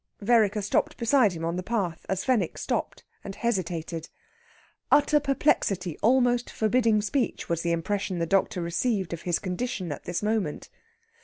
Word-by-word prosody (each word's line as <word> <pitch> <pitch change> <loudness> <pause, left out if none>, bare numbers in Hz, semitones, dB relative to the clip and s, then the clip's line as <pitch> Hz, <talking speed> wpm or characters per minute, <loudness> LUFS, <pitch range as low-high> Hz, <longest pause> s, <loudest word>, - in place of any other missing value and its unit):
Vereker 210 -1 +3
stopped 200 - 0
beside 235 -4 +3
him 165 -1 -4
on 170 +1 -2
the - - -2
path, 185 -5 -3
as 190 0 -1
Fenwick 230 -10 +1
stopped - - -3 0.2
and 195 -1 -7
hesitated. 170 -7 -2 0.8
Utter 295 +1 +5
perplexity 200 - +1
almost 245 +1 +3
forbidding 220 -1 +2
speech 250 +3 -1
was 170 -1 -1
the 170 - 0
impression 185 +3 -1
the 170 - 0
doctor 185 0 +1
received 190 +1 -1
of 170 - -5
his 170 - +3
condition 185 -2 -3
at 145 - -7
this 175 +3 -3
moment. 210 -8 -1
200 Hz, 155 wpm, -27 LUFS, 170-235 Hz, 0.8 s, Utter